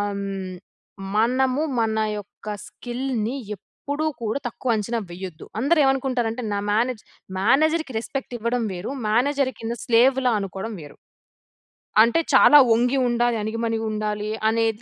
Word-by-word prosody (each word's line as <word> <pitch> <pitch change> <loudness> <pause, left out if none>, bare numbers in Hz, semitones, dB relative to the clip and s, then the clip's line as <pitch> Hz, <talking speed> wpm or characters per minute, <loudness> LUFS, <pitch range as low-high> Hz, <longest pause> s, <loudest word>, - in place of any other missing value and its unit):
హ్మ్, 195 -1 -4 0.6
మనము 255 +5 +2 0.2
మన 220 -1 +1 0.2
యొక్క 205 +1 -11 0.2
స్కిల్‌ని, 245 -1 -3 0.2
ఎప్పుడూ 285 - -5 0.2
కూడ 220 -2 -2
తక్కువ 250 +1 -5
అంచనా 230 +2 -1
వెయ్యద్దు. 180 -2 -8 0.2
అందరు 305 +5 +3
ఏవనుకుంటారంటే, 255 -3 0
నా 200 - 0
మేనేజ్ 235 +1 0 0.4
మేనేజర్‌కి 305 - +2
రెస్పెక్ట్ 250 +1 -5
ఇవ్వడం 235 +2 0
వేరు, 180 +7 -5 0.2
మేనేజర్‌ 265 +4 +2
కింద 230 +1 -3
స్లేవ్‌లా 250 +1 +4
అనుకోడం 195 +3 -5
వేరు. 145 -1 -12 1.1
అంటే, 230 +7 +4
చాలా 295 +2 +8
వంగి 245 +4 +3
ఉండాలి. 240 0 +1
అణిగిమణిగుండాలి 215 -1 -2 0.2
అనేది 225 -1 0
230 Hz, 115 wpm, -23 LUFS, 215-260 Hz, 1.1 s, చాలా